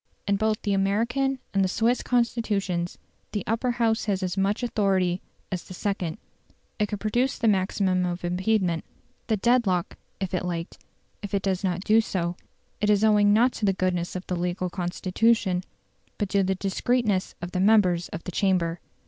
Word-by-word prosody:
In 200 Hz, -, +3 dB
both 215 Hz, +1 st, +1 dB
the 205 Hz, -, +1 dB
American 235 Hz, +8 st, +1 dB, 0.2 s
and 195 Hz, -1 st, +3 dB
the -, -, +2 dB
Swiss 235 Hz, +5 st, +1 dB
Constitutions 205 Hz, -7 st, 0 dB, 0.4 s
the 205 Hz, -3 st, -1 dB
Upper 230 Hz, +3 st, 0 dB
House 230 Hz, -1 st, +1 dB
has 195 Hz, -3 st, 0 dB
as 185 Hz, -1 st, -2 dB
much 200 Hz, +4 st, 0 dB
authority 190 Hz, -6 st, +1 dB, 0.3 s
as 185 Hz, -1 st, -3 dB
the 185 Hz, -, -9 dB
second: 190 Hz, -3 st, -2 dB, 0.6 s
it 210 Hz, -, +2 dB
could 205 Hz, 0 st, -4 dB
produce 240 Hz, +6 st, 0 dB
the 230 Hz, -, 0 dB
maximum 190 Hz, -2 st, +2 dB
of 175 Hz, 0 st, -3 dB
impediment 180 Hz, -1 st, +1 dB, 0.4 s
the 220 Hz, -, +1 dB
dead 240 Hz, +2 st, +3 dB
lock, 180 Hz, -2 st, 0 dB, 0.2 s
if 190 Hz, -2 st, -3 dB
it 180 Hz, -, 0 dB
liked; 170 Hz, -1 st, -4 dB, 0.4 s
if 200 Hz, -1 st, -3 dB
it 195 Hz, -, 0 dB
does 190 Hz, -1 st, 0 dB
not 180 Hz, -1 st, 0 dB
do 220 Hz, +2 st, +5 dB
so, 175 Hz, -5 st, -2 dB, 0.5 s
it 210 Hz, -, +2 dB
is 210 Hz, 0 st, +4 dB
owing 210 Hz, -1 st, +5 dB
not 235 Hz, +5 st, +5 dB
to -, -, -8 dB
the 195 Hz, -, +3 dB
goodness 180 Hz, -2 st, -1 dB
of 185 Hz, -, -5 dB
the 180 Hz, -, -2 dB
legal 180 Hz, +1 st, -2 dB
constitution, 185 Hz, +2 st, +1 dB, 0.5 s
but 205 Hz, -, -1 dB
to 200 Hz, 0 st, +2 dB
the 190 Hz, 0 st, 0 dB
discreetness 200 Hz, +1 st, 0 dB
of 175 Hz, 0 st, -6 dB
the 180 Hz, -, -2 dB
members 185 Hz, -4 st, +4 dB
of 165 Hz, -, -6 dB
the 180 Hz, -, -5 dB
Chamber. 175 Hz, -3 st, +1 dB
195 Hz, 180 wpm, -26 LUFS, 180-215 Hz, 0.6 s, do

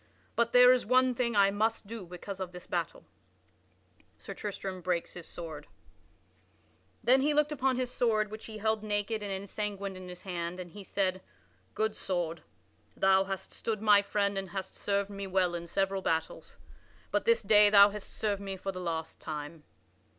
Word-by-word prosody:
But 235 Hz, 0 st, +2 dB
there 250 Hz, 0 st, +8 dB
is 255 Hz, -, +1 dB
one 255 Hz, +2 st, +3 dB
thing 235 Hz, -2 st, -1 dB
I 200 Hz, -1 st, +5 dB
must 220 Hz, +2 st, 0 dB
do 215 Hz, -3 st, -7 dB
because 180 Hz, +2 st, -7 dB
of 185 Hz, -2 st, -4 dB
this 180 Hz, 0 st, -10 dB
battle." -, -, -3 dB, 0.9 s
[Sidenote: -, -, -30 dB
Sir -, -, -8 dB
Tristram 195 Hz, -2 st, -5 dB
breaks 175 Hz, -1 st, -1 dB
his 175 Hz, -2 st, -9 dB
sword] 160 Hz, -4 st, -8 dB, 1.4 s
Then 260 Hz, +2 st, +5 dB
he 295 Hz, +2 st, +2 dB
looked 300 Hz, 0 st, +3 dB
upon 265 Hz, -2 st, +1 dB
his 250 Hz, 0 st, -2 dB
sword 215 Hz, -4 st, +1 dB
which 215 Hz, 0 st, -8 dB
he 220 Hz, -1 st, -8 dB
held 220 Hz, 0 st, 0 dB
naked 210 Hz, +1 st, -1 dB
and 205 Hz, -1 st, -4 dB
ensanguined 200 Hz, 0 st, -4 dB
in 185 Hz, -1 st, -9 dB
his 180 Hz, 0 st, -9 dB
hand 175 Hz, -1 st, -4 dB
and 175 Hz, -2 st, -7 dB
he 205 Hz, +2 st, -10 dB
said: 185 Hz, 0 st, -1 dB, 0.5 s
"Good 220 Hz, 0 st, 0 dB
sword; 170 Hz, -3 st, -2 dB, 0.6 s
thou 190 Hz, 0 st, +4 dB
hast 195 Hz, -1 st, -5 dB
stood 220 Hz, -2 st, -3 dB
my 205 Hz, -2 st, +7 dB
friend 200 Hz, -1 st, 0 dB
and 190 Hz, -1 st, -6 dB
hast 190 Hz, +1 st, -5 dB
served 200 Hz, 0 st, -1 dB
me 200 Hz, -1 st, -5 dB
well 185 Hz, -2 st, +1 dB
in 170 Hz, 0 st, -5 dB
several 195 Hz, +2 st, 0 dB
battles, 160 Hz, -2 st, -2 dB, 0.5 s
but -, -, 0 dB
this 465 Hz, 0 st, +3 dB
day 210 Hz, -1 st, +7 dB
thou 200 Hz, 0 st, +8 dB
hast 210 Hz, -1 st, -7 dB
served 205 Hz, -2 st, -2 dB
me 195 Hz, -1 st, -5 dB
for 195 Hz, +1 st, -4 dB
the 185 Hz, -1 st, -7 dB
last 165 Hz, -2 st, -4 dB
time." 150 Hz, 0 st, -7 dB
200 Hz, 185 wpm, -30 LUFS, 185-220 Hz, 1.4 s, there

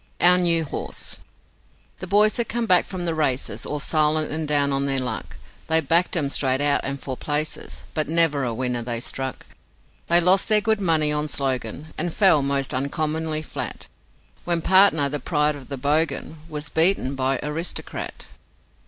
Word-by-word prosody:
Our 180 Hz, +1 st, +6 dB
New 170 Hz, -2 st, +3 dB
Horse 150 Hz, -, -4 dB, 0.8 s
The 185 Hz, -, -6 dB
boys 210 Hz, +4 st, +3 dB
had 235 Hz, -2 st, -2 dB
come 235 Hz, 0 st, -2 dB
back 180 Hz, -5 st, +3 dB
from 180 Hz, -2 st, -4 dB
the 165 Hz, -, 0 dB
races 140 Hz, -5 st, -2 dB
All 150 Hz, -, -3 dB
silent 155 Hz, +1 st, +1 dB
and 155 Hz, 0 st, -3 dB
down 145 Hz, -1 st, +3 dB
on 140 Hz, +1 st, +1 dB
their 135 Hz, -1 st, +2 dB
luck; 125 Hz, -4 st, -3 dB, 0.3 s
They'd 160 Hz, -3 st, +3 dB
backed 170 Hz, +3 st, +2 dB
'em, 140 Hz, -4 st, 0 dB
straight 130 Hz, -2 st, 0 dB
out 145 Hz, 0 st, +2 dB
and 140 Hz, 0 st, -3 dB
for 130 Hz, -1 st, -5 dB
places, 150 Hz, +3 st, -3 dB
But 155 Hz, -, -1 dB
never 160 Hz, -4 st, +3 dB
a 120 Hz, -, -2 dB
winner 125 Hz, +1 st, -3 dB
they 120 Hz, 0 st, -2 dB
struck. 130 Hz, +2 st, -4 dB, 0.6 s
They 170 Hz, +1 st, +7 dB
lost 185 Hz, +5 st, +2 dB
their 215 Hz, -1 st, +5 dB
good 220 Hz, 0 st, -1 dB
money 160 Hz, -4 st, +2 dB
on 150 Hz, 0 st, 0 dB
Slogan, 135 Hz, +1 st, -3 dB
And 175 Hz, -, -2 dB
fell, 185 Hz, -5 st, +4 dB
most 140 Hz, -1 st, 0 dB
uncommonly 155 Hz, +3 st, -2 dB
flat, -, -, -6 dB, 0.5 s
When 170 Hz, -2 st, -1 dB
Partner, 185 Hz, -6 st, +4 dB
the 145 Hz, +1 st, -4 dB
pride 150 Hz, +1 st, 0 dB
of 140 Hz, -2 st, -13 dB
the 140 Hz, -, -5 dB
Bogan, 155 Hz, +3 st, -1 dB
Was 150 Hz, -1 st, -5 dB
beaten 160 Hz, -5 st, +2 dB
by 135 Hz, -1 st, -1 dB
Aristocrat. 155 Hz, +4 st, -5 dB
150 Hz, 175 wpm, -22 LUFS, 140-170 Hz, 0.8 s, They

